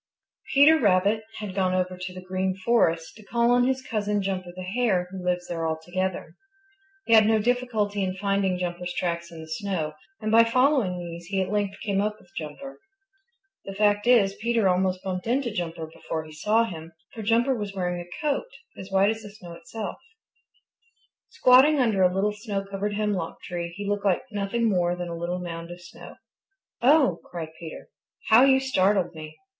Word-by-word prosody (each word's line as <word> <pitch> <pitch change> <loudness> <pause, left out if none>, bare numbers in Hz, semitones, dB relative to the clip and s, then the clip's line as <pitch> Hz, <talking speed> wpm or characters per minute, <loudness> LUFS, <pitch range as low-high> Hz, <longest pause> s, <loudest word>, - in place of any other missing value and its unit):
Peter 305 +3 +7
Rabbit 205 0 +3
had 210 -3 -5
gone 185 -1 +1
over 185 0 -1
to 180 0 -6
the 185 0 -9
Green 185 0 -1
Forest 180 -6 +1
to 215 - -14
call 235 +3 +1
on 245 0 +4
his 260 0 -1
cousin, 210 -2 -1
Jumper 185 -2 -3
the 185 - -6
Hare, 190 -2 0
who 190 -1 -7
lives 180 0 -1
there 165 -1 -2
altogether. 175 +1 -3 0.7
He 230 - +2
had 215 -1 +7
no 220 0 +4
difficulty 220 -3 0
in 185 0 -2
finding 195 -1 0
Jumper's 180 0 -4
tracks 170 -1 -2
in 165 -1 -9
the 160 - -10
snow, 160 -2 -3 0.3
and 215 - -2
by 230 +1 +7
following 250 -5 +2
these 170 -1 -7
he 195 +1 -1
at 190 0 -1
length 205 -1 -1
came 200 -3 0
up 210 +1 -2
with 175 - -22
Jumper. 165 - -7 0.9
The 195 - -7
fact 205 +1 +2
is, 215 -6 +5
Peter 230 -3 +2
almost 185 0 +1
bumped 185 0 -4
into 245 0 0
Jumper 170 -4 -4
before 160 0 -5
he 155 - -13
saw 210 +9 +2
him, 165 -6 -7 0.2
for 225 - -7
Jumper 235 +5 +2
was 205 -3 -5
wearing 180 -2 -2
a 175 0 -10
coat 285 -2 0 0.3
as 190 - -9
white 195 +2 +3
as 220 0 -5
the 210 - -9
snow 180 -4 -11
itself. 225 +4 -7 1.3
Squatting 270 +4 +5
under 220 -6 +2
a 180 -1 +5
little 200 +3 0
snow 205 -2 -4
covered 200 +1 -3
hemlock 205 -5 -2
tree 170 -1 -4
he 205 0 -5
looked 205 0 -1
like 190 -3 +2
nothing 210 +3 -1
more 175 -4 +1
than 175 -1 -5
a 170 - -4
little 170 +2 -3
mound 170 -1 -6
of 175 0 -9
snow. 175 0 -12 0.7
"Oh!" 280 +2 +4
cried 165 -2 -6
Peter. 165 -2 -9 0.4
"How 230 +3 +8
you 265 -1 +5
startled 195 -8 +1
me! 155 -1 -10
195 Hz, 190 wpm, -25 LUFS, 180-220 Hz, 1.3 s, How